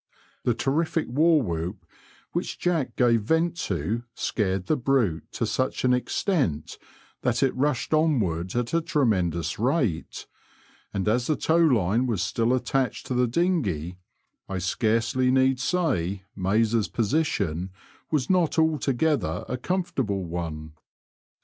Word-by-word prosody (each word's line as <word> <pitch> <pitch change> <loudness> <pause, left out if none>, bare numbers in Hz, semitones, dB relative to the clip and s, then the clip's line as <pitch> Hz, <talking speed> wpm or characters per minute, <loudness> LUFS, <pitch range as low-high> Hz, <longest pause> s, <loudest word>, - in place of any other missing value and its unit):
The 120 - +2
terrific 155 +5 0
war 155 +3 +4
whoop 85 +1 -4 0.5
which - - -3
Jack 170 -6 -1
gave 120 -3 +3
vent 160 +9 +1
to 100 - -2
scared 95 -3 -1
the 155 - +2
brute 120 - 0
to 115 - -1
such 130 +4 -1
an 125 - +4
extent 125 - -1 0.4
that 120 +1 +1
it 135 - +1
rushed 145 +2 0
onward 105 - +1
at 120 +2 -1
a 165 - +3
tremendous 90 - 0
rate^ 120 - -1 0.7
and 100 +1 -2
as 120 +3 +1
the 155 - +2
tow 160 +3 +1
line 120 - +3
W8S 110 -6 -1
still 115 +4 0
attached 130 +1 -1
to - - -3
the 125 0 +2
dinghey, 115 - 0 0.5
I 95 - -2
scarcely 115 +7 +1
need 130 0 +3
say 125 - 0
Mayes* 105 +3 +1
position 100 - -1 0.4
was 150 -5 0
not 180 -4 +2
altogether 155 -2 +1
a 125 - -2
com 180 +9 -1
fortable 120 - -2
one. 80 -2 -5
120 Hz, 135 wpm, -25 LUFS, 95-150 Hz, 0.7 s, war